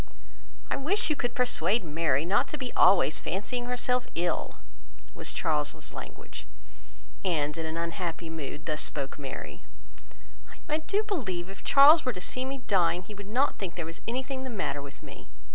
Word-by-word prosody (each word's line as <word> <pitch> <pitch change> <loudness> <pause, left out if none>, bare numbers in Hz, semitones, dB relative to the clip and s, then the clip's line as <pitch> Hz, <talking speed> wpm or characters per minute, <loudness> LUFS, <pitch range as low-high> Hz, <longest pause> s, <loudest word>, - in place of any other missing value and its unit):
"I - - +2
wish 320 +4 +2
you - - +2
could 245 -3 -2
persuade 240 -3 +2
Mary 155 -2 +1
not 205 +9 +3
to 300 - -4
be 255 -3 -4
always 185 -4 +5
fancying 240 +7 -2
herself 250 0 0
ill," 175 +1 -1 0.6
was - - -4
Charles's 150 -3 -1
language; 110 - -9 0.8
and, 150 -5 +1
in 165 -1 -3
an 160 +1 -3
unhappy 170 0 -3
mood, 160 -1 -6
thus 155 -1 -1
spoke 140 -1 -2
Mary: 135 -2 -6 1.1
"I 305 +1 +1
do 405 +6 0
believe 195 - -2
if 195 - -12
Charles 295 +3 +8
were 255 - 0
to 180 - -6
see 255 +7 -2
me 265 -1 -5
dying, 180 -2 +2
he 210 - -10
would 200 -1 -9
not 255 +7 +2
think 185 -3 -4
there 170 - -3
was 165 +1 -8
anything 260 +2 -2
the 260 - -4
matter 185 - -2
with 140 0 -11
me. - - -12
190 Hz, 175 wpm, -29 LUFS, 165-255 Hz, 1.1 s, Charles